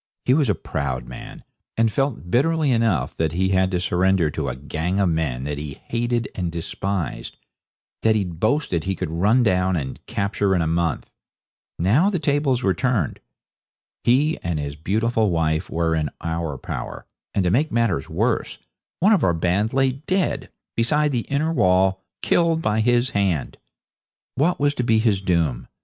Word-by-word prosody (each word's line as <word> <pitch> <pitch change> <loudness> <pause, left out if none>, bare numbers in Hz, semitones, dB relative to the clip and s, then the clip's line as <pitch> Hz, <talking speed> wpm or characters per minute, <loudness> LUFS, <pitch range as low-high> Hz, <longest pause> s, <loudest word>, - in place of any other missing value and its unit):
He 125 - +4
was 145 -1 +2
a - - +3
proud 65 -3 -3
man, 60 - -10 0.3
and 115 -1 +3
felt 135 -9 -2
bitterly 155 - +2
enough 115 - +1
that 80 -2 0
he 95 +2 +1
had 95 -1 +2
to 90 -2 -1
surrender 90 -2 +2
to 70 -3 -2
a 60 - -4
gang 80 +7 -2
of 95 -3 +3
men 75 -7 -1
that 75 +1 -3
he 75 -2 -7
hated 120 0 0
and 90 -3 -3
despised, 90 +2 -4 0.6
that 110 -1 +3
he'd 90 -6 -2
boasted 110 - 0
he 95 0 -1
could 90 -4 -4
run 105 +9 +3
down 95 -3 +2
and 70 -5 -4
capture 100 -1 0
in 85 - +2
a - - -1
month. 85 -1 -1 0.7
Now 120 - +3
the 195 - 0
tables 145 -5 +1
were 95 - +3
turned. 110 - 0 0.8
He 140 +6 +3
and 85 -2 -2
his 70 -1 -4
beautiful 110 +7 0
wife 80 0 0
were 85 0 0
in 80 -2 0
our 80 -3 -3
power, - - -6 0.3
and, 100 - +2
to 90 - +1
make 145 +9 +2
matters 110 -11 0
worse, - - -1 0.4
one 205 +5 +6
of 200 - +2
our 85 -2 +3
band 90 +6 +1
lay 135 0 +2
dead, 145 0 -2 0.3
beside 150 +6 +2
the 120 -4 -2
inner 155 +4 0
wall, 95 - +3 0.2
killed 165 -1 +2
by 110 -8 0
his 120 +3 +2
hand. 95 -7 -1 0.7
What 160 +7 +1
was 145 0 +2
to 125 - -2
be 115 -2 +3
his 110 -4 +2
doom? 85 -9 0
95 Hz, 175 wpm, -22 LUFS, 85-125 Hz, 0.8 s, one